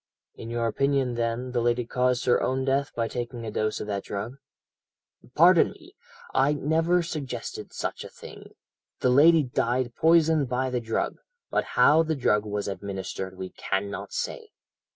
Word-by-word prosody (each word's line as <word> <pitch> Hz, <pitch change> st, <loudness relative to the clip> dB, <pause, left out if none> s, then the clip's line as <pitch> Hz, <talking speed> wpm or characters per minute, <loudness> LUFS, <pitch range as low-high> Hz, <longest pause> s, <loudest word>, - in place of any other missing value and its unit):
"'In 115 Hz, -, -9 dB
your 120 Hz, 0 st, -1 dB
opinion, 135 Hz, +2 st, +1 dB
then, 120 Hz, +2 st, -2 dB
the 120 Hz, -1 st, 0 dB
lady 120 Hz, 0 st, +1 dB
caused 125 Hz, +1 st, 0 dB
her 125 Hz, -, +3 dB
own 130 Hz, +1 st, 0 dB
death 135 Hz, +1 st, 0 dB
by 115 Hz, -1 st, 0 dB
taking 120 Hz, 0 st, -5 dB
a 110 Hz, -, -4 dB
dose 110 Hz, +1 st, -1 dB
of -, -, -4 dB
that 100 Hz, -2 st, -3 dB
drug?' 110 Hz, +6 st, -5 dB, 1.0 s
"'Pardon 170 Hz, +2 st, +6 dB
me, 355 Hz, +3 st, -18 dB, 0.4 s
I 140 Hz, +2 st, +3 dB
never 160 Hz, +4 st, +1 dB
suggested 155 Hz, -6 st, -6 dB
such -, -, -4 dB
a -, -, -9 dB
thing; -, -, -13 dB, 0.5 s
the 125 Hz, -, +3 dB
lady 155 Hz, +4 st, +6 dB
died 125 Hz, -1 st, -1 dB
poisoned 160 Hz, -4 st, +3 dB
by 130 Hz, +1 st, -1 dB
the 125 Hz, -1 st, -1 dB
drug, 115 Hz, -1 st, -2 dB, 0.3 s
but -, -, +1 dB
how 155 Hz, +2 st, +6 dB
the 160 Hz, -1 st, -1 dB
drug 105 Hz, -6 st, +1 dB
was 105 Hz, -1 st, -3 dB
administered 95 Hz, -1 st, -5 dB
we 95 Hz, 0 st, -5 dB
cannot 100 Hz, +1 st, -3 dB
say. -, -, -4 dB
125 Hz, 165 wpm, -26 LUFS, 115-145 Hz, 1.0 s, Pardon